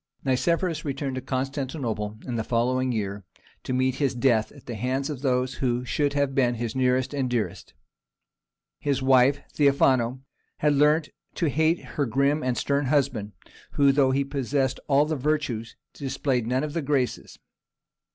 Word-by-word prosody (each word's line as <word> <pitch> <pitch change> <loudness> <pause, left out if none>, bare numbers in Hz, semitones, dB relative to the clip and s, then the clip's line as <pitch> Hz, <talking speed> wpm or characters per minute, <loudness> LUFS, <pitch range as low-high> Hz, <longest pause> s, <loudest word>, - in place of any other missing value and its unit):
Nicephorus 165 +6 +1
returned 140 -1 -3
to 130 - -3
Constantinople 130 -5 -3
in 125 - -4
the 110 - -1
following 125 +3 +1
year, 100 -3 -3 0.4
to - - -5
meet 130 0 +1
his 135 -3 +1
death 120 -3 +2
at 140 - -16
the 120 - -5
hands 130 +6 -2
of 135 -4 -6
those 130 -1 +1
who 125 -1 0
should 145 +3 0
have 140 -1 0
been 125 -3 +2
his 115 0 -4
nearest 130 +1 +1
and 135 -3 -1
dearest. 120 -3 -3 1.0
His 140 -2 -1
wife, 130 +1 +4
Theophano 130 -3 +3 0.4
had 150 -1 +2
learnt 150 +2 +3 0.3
to 165 - +1
hate 160 +3 +1
her 145 -3 -2
grim 140 +5 +1
and 125 -3 -1
stern 140 -1 0
husband, 130 -7 0 0.4
who, 140 -1 +4
though 135 -1 +3
he 135 +1 +2
possessed 135 -1 -1
all 140 +1 +4
the 155 +1 -1
virtues, 135 -6 -2 0.2
displayed 135 -3 -1
none 130 +3 0
of 150 -1 -4
the 165 - -1
graces. 135 -3 -1
135 Hz, 160 wpm, -25 LUFS, 125-145 Hz, 1.0 s, wife